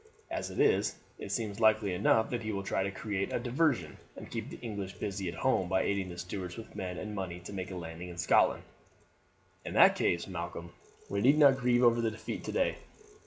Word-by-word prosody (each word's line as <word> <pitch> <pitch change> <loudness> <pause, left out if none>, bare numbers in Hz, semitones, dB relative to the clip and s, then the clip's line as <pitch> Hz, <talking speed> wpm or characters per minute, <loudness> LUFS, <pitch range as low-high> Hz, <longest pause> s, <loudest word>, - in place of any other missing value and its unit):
As - - -3
it - - -6
is, - - +3 0.2
it - - -6
seems 110 -3 -2
likely 110 -3 +4
enough 110 +4 +3
that 120 -2 -1
he 110 -1 -3
will 100 -1 -3
try 95 - -1
to 95 - 0
create 100 0 -3
a - - 0
diversion, 130 +3 0 0.2
and - - -10
keep - - -4
the - - -8
English 100 -5 -5
busy 95 -1 -3
at 85 - -6
home 95 -2 +1
by 95 0 +2
aiding 100 -2 -1
the 85 - -8
Stuarts 90 0 -5
with 115 - -10
men 90 -1 -4
and 105 -1 -5
money 95 -3 -4
to 90 - -9
make 95 -1 -4
a 95 - -6
landing 85 0 -7
in 85 - -9
Scotland." 85 - +3 1.0
"In - - -6
that - - +7
case, 85 - +1
Malcolm, 85 -2 -6 0.4
we 100 - -1
need 140 +6 +5
not 140 -3 +6
grieve 125 -1 +3
over 120 -1 +5
the 115 - +1
defeat 110 0 -6
today. - - 0
100 Hz, 215 wpm, -31 LUFS, 90-115 Hz, 1.0 s, that